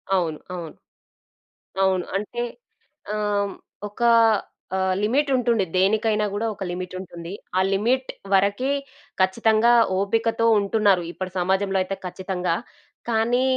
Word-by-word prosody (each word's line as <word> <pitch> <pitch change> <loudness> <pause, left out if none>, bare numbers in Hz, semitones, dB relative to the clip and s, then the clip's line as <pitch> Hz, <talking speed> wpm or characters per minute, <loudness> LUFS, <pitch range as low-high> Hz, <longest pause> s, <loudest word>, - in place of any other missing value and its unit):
అవును. 165 -4 -1 0.2
అవును. 170 -3 -7 1.1
అవును. 185 -2 +2
అంటే, 210 +4 -3 0.7
ఆహ్, - - -1 0.3
హ్మ్, 200 - -5 0.3
ఒకా 235 +3 +1 0.7
ఆహ్, 190 0 +1
లిమిటుంటుండె. 245 -3 +2
దేనికైనా 210 +3 +2
గూడా 215 +3 -1
ఒక 195 - -9
లిమిటుంటుంది. 180 -1 -6 0.3
ఆ - - +4
లిమిట్ 250 +6 +1 0.2
వరకే 200 +8 +2 0.5
ఖచ్చితంగా 220 +4 +4 0.3
ఓపికతో 225 +3 +1
ఉంటున్నారు, 200 -2 +2
ఇప్పడి 185 0 -5
సమాజంలో 190 +2 +1
అయితే 190 +1 -3
ఖచ్చితంగా. 180 -1 -2 0.5
కానీ, 235 +2 +2
200 Hz, 105 wpm, -23 LUFS, 185-225 Hz, 1.1 s, ఆ